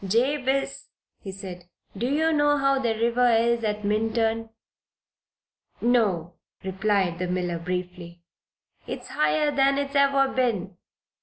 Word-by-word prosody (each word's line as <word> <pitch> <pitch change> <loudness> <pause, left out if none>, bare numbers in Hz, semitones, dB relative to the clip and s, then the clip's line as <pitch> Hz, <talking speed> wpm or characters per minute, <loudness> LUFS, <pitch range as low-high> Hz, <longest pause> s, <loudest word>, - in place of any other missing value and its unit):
"Jabez," 270 +5 0 0.3
he 195 - -7
said, 185 -2 -9 0.3
"do 235 +5 -2
you 320 +3 +2
know 290 -1 +3
how 275 -1 +2
the 235 -4 0
river 235 +2 +2
is 235 0 +2
at 210 -1 -2
Minturn?" 225 +1 0 1.3
"No," 200 -9 +1 0.3
returned 190 -2 0
the 180 - -2
miller, 180 -1 -2
briefly. 180 -1 -5 0.6
"It's - - -6
higher 155 - +1
than 275 0 +3
it's 280 0 -2
ever 275 -1 +4
been. 205 -8 -1
225 Hz, 125 wpm, -25 LUFS, 185-270 Hz, 1.3 s, ever